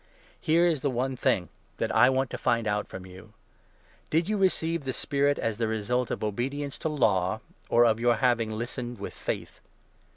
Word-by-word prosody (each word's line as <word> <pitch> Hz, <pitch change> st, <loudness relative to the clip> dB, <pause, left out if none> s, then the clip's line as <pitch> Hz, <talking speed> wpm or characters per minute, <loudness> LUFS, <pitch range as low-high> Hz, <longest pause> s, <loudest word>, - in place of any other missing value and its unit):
Here 170 Hz, +2 st, +3 dB
is 160 Hz, -6 st, +1 dB
the 145 Hz, -, +1 dB
one 130 Hz, +1 st, -1 dB
2 -, -, -5 dB
thing 90 Hz, -6 st, +1 dB, 0.3 s
that -, -, -1 dB
I 120 Hz, +3 st, +7 dB
want 130 Hz, -1 st, 0 dB
to -, -, -3 dB
find 115 Hz, -1 st, +1 dB
out 105 Hz, -1 st, -1 dB
from 95 Hz, -1 st, -8 dB
you 95 Hz, +4 st, -13 dB, 0.4 s
— -, -, -33 dB
Did 165 Hz, +2 st, +1 dB
you 215 Hz, -, 0 dB
receive 170 Hz, -5 st, +1 dB
the 130 Hz, -1 st, -2 dB
Spirit 140 Hz, +2 st, +1 dB
as 115 Hz, -1 st, -2 dB
the 115 Hz, -, +1 dB
result 110 Hz, +3 st, -1 dB
of -, -, -3 dB
obedience 135 Hz, +7 st, -3 dB
to 160 Hz, -, -1 dB
Law, 95 Hz, -9 st, +1 dB, 0.3 s
or 120 Hz, +1 st, +5 dB
of 115 Hz, -1 st, +3 dB
your 120 Hz, 0 st, +3 dB
having 120 Hz, -4 st, +2 dB
listened 120 Hz, +2 st, -4 dB
with -, -, -6 dB
faith -, -, -5 dB
120 Hz, 200 wpm, -27 LUFS, 110-140 Hz, 0.4 s, I